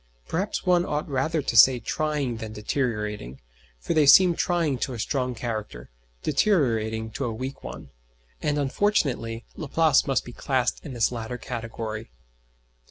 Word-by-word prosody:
Perhaps 195 +6 -2
one 180 -1 +4
ought 150 -5 -2
rather 150 +3 0
to - - -2
say 125 +2 +8
trying 145 -1 -2
than 110 -1 -7
deteriorating; 105 - -3 0.4
for - - -3
they 155 -3 +4
seem 180 +5 +8
trying 165 -8 0
to 130 - -2
a 120 - -6
strong 125 +1 -1
character, 105 - -5 0.3
deteriorating 115 - +1
to 135 - -3
a 120 - -2
weak 130 +5 -6
one - - -9 0.5
and 150 0 0
unfortunately, 135 - 0
Laplace 155 -1 +2
must 135 -2 +1
be 120 - -9
classed 130 -1 -1
in 145 - -7
this 120 -1 +1
latter 120 0 -5
category. 115 -2 -5
130 Hz, 150 wpm, -25 LUFS, 115-150 Hz, 0.5 s, say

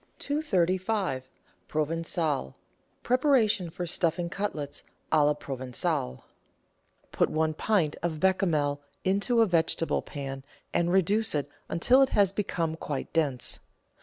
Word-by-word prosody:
235— 190 - 0 0.4
PROVEN^ALE 155 - -1 0.5
(preparation 240 - +3
for 175 +2 -5
stuffing 170 0 0
cutlets 160 -9 -4 0.3
a 155 -2 +5
la 150 0 +3
Provencale) 125 - -2 0.9
Put - - +2
one 155 0 +1
pint 165 -3 +1
of 165 -3 -2
Bechamel 155 -6 +1 0.2
into 200 +5 +2
a - - +6
vegetable 165 -3 +1
pan 135 -2 -6 0.3
and 170 0 +2
reduce 195 +2 +2
it 145 -1 -1 0.2
until 250 +10 +4
it 270 - +4
has 200 -2 +5
become 170 -5 -2
quite 145 -4 -5
dense. 145 -6 +1
170 Hz, 115 wpm, -28 LUFS, 150-195 Hz, 0.9 s, a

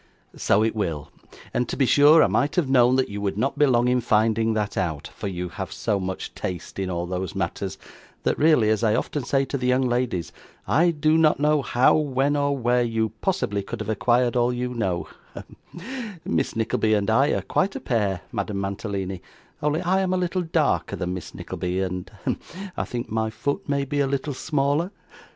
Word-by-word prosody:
'So 105 - +2
it 110 - 0
will; 75 -8 -3 0.4
and 125 - 0
to - - -3
be 135 - +3
sure 145 +5 +7
I - - +4
might 145 - +1
have 175 -6 +2
known 125 -1 +5
that 130 0 +1
you 100 0 -5
would 100 -1 -2
not 135 +6 -1
be 145 - +6
long 120 -1 +3
in 125 0 +2
finding 110 0 +2
that 105 -2 -1
out; 80 -6 -2
for - - -6
you 90 -2 -4
have 95 0 -6
so 105 -3 -1
much 95 0 -4
taste 90 +1 -5
in 95 -1 -2
all 85 -1 -2
those 90 -1 -4
matters, - - -3 0.5
that - - +1
really, 150 -8 +4
as 110 +1 0
I 110 -1 +3
often 145 +3 -2
say 135 +2 +1
to 140 +1 -3
the 125 - -1
young 130 +1 +3
ladies, 120 -9 -1 0.4
I 170 +4 +4
do 155 0 +2
not 155 -2 +4
know 150 0 +3
how, 125 -1 +3
when, 145 -1 +1
or 140 -1 +1
where, 125 0 +2
you 115 -2 0
possibly 170 - 0
could 100 - -6
have 110 0 -4
acquired 120 +3 +2
all 120 0 +3
you 125 0 -3
know 95 -7 -1 0.3
hem - - -10 0.7
Miss - - -1
Nickleby 110 -1 +1
and 100 -1 0
I 120 +6 +4
are - - -1
quite 195 0 0
a - - -3
pair, 100 -7 0
Madame 100 -3 -3
Mantalini, 95 -2 -3 0.4
only 150 +4 0
I 185 +2 +2
am 185 -1 0
a - - +1
little 180 0 0
darker 165 -2 0
than 90 +1 -3
Miss 90 - -7
Nickleby, 90 +1 -3
and 90 -1 -3
hem - - 0 0.4
I - - -2
think 120 -3 -5
my 110 0 0
foot 130 +7 -3
may 140 -1 +1
be 145 +1 -2
a 140 - +2
little 140 +2 -2
smaller. 145 +4 0
120 Hz, 210 wpm, -24 LUFS, 100-140 Hz, 0.7 s, sure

